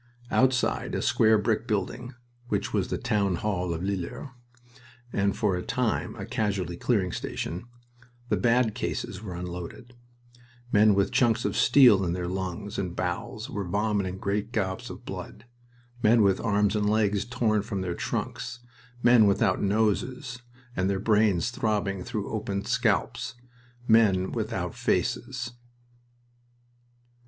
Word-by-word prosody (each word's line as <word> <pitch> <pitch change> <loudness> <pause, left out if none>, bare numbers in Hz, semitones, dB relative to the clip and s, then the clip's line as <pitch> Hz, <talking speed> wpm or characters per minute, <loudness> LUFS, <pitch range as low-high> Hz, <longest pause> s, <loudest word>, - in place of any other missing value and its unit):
Outside 130 -1 +2
a - - -1
square 110 -1 +4
brick 110 +2 0
building, 120 +4 -2 0.3
which 100 -3 -2
was 100 -4 +1
the - - -2
Town 105 -6 +1
Hall 90 -2 -1
of 85 +1 -3
Lillers, 100 +7 -4 0.8
and 100 0 +1
for 105 -4 +1
a 90 - -2
time 120 +3 -1
a - - -6
casualty 95 -5 -1
clearing 95 -2 0
station, 90 +7 -4 0.6
the 110 - +2
"bad" 120 -1 +2
cases 95 - -4
were 95 -5 -6
unloaded; 90 +7 -7 0.8
men 105 -1 +5
with 100 0 +2
chunks 120 -2 +2
of - - -1
steel 120 -9 +6
in 85 -2 0
their 90 -1 -3
lungs 95 +2 -4
and 90 -2 -3
bowels 90 +5 -3
were 100 - -4
vomiting 100 0 -1
great 100 +3 -2
gobs 95 -6 -2
of - - -10
blood, 105 - -8 0.6
men 115 0 +5
with 95 -1 +3
arms 105 -2 +2
and 105 -1 +1
legs 105 -2 +2
torn 120 -4 +1
from 100 -2 -4
their 90 -2 -2
trunks, 115 +6 -4 0.4
men 120 -3 +7
without 95 -1 +2
noses, 110 - 0 0.3
and 95 +1 +1
their 100 - +1
brains 105 -1 +2
throbbing 100 -5 -1
through 110 -3 -4
opened 100 -2 -3
scalps, - - 0 0.5
men 100 -5 +4
without - - -3
faces... 120 -1 -1
105 Hz, 140 wpm, -27 LUFS, 95-115 Hz, 0.8 s, men